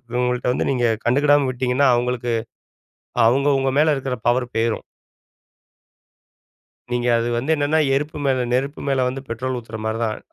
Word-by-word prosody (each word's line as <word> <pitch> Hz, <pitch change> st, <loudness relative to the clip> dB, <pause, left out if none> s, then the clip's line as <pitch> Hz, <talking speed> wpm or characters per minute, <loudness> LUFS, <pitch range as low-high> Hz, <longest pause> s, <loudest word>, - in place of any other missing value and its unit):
இவங்கள்ட்ட 125 Hz, 0 st, 0 dB
வந்து -, -, -1 dB
நீங்க 125 Hz, -3 st, 0 dB, 0.2 s
கண்டுக்கிடாம 145 Hz, +3 st, +3 dB
விட்டிங்கன்னா 130 Hz, +2 st, +1 dB
அவங்களுக்கு 120 Hz, 0 st, -1 dB, 1.0 s
அவங்க 135 Hz, +4 st, +2 dB
உங்க 135 Hz, -, +1 dB
மேல 155 Hz, 0 st, +4 dB
இருக்குற 135 Hz, -1 st, -3 dB
பவர் 125 Hz, 0 st, +1 dB
போயிரும். 115 Hz, 0 st, 0 dB, 2.1 s
நீங்க 120 Hz, 0 st, 0 dB
அது 115 Hz, +1 st, -1 dB
வந்து 130 Hz, +6 st, -2 dB
என்னென்னா 145 Hz, +1 st, +1 dB, 0.2 s
எருப்பு 150 Hz, +2 st, -2 dB
மேல 130 Hz, -2 st, +1 dB
நெருப்பு 135 Hz, +4 st, -1 dB
மேல 135 Hz, -2 st, +2 dB
வந்து 130 Hz, +2 st, -4 dB
பெட்ரோல் 125 Hz, +3 st, -3 dB
ஊத்துற 115 Hz, -2 st, -8 dB
மாரி 110 Hz, +1 st, -2 dB
தான். 110 Hz, -2 st, -1 dB
125 Hz, 145 wpm, -21 LUFS, 120-140 Hz, 2.1 s, மேல